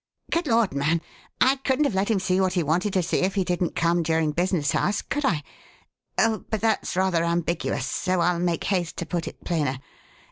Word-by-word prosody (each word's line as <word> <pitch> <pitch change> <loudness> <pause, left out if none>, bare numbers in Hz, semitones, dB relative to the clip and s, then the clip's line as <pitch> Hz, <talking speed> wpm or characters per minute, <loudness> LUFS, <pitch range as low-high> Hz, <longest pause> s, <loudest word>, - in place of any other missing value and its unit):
"Good 335 -1 0
Lord, 230 - +2
man! 150 +4 +1 0.4
I 265 +2 +4
couldn't 270 +2 +1
have 275 - 0
let 190 +3 0
him 220 - +3
see 185 0 +1
what 185 -1 +1
he 175 -2 +1
wanted 175 +7 +1
to 185 - +2
see 165 - 0
if 190 +2 0
he 195 - +2
didn't 175 -1 -1
come 170 +1 +2
during 160 -1 +1
business 170 -2 0
hours, 205 - 0
could 290 +1 -3
I? 160 - +1 0.7
But 220 -1 0
that's 225 -5 0
rather 185 -3 +2
ambiguous, 170 -5 -1
so 185 +6 -1
I'll 170 0 +2
make 175 -1 0
haste 180 -4 -1
to 170 - -3
put 170 0 -3
it - - -9
plainer. 145 -6 0
180 Hz, 205 wpm, -25 LUFS, 165-200 Hz, 0.7 s, I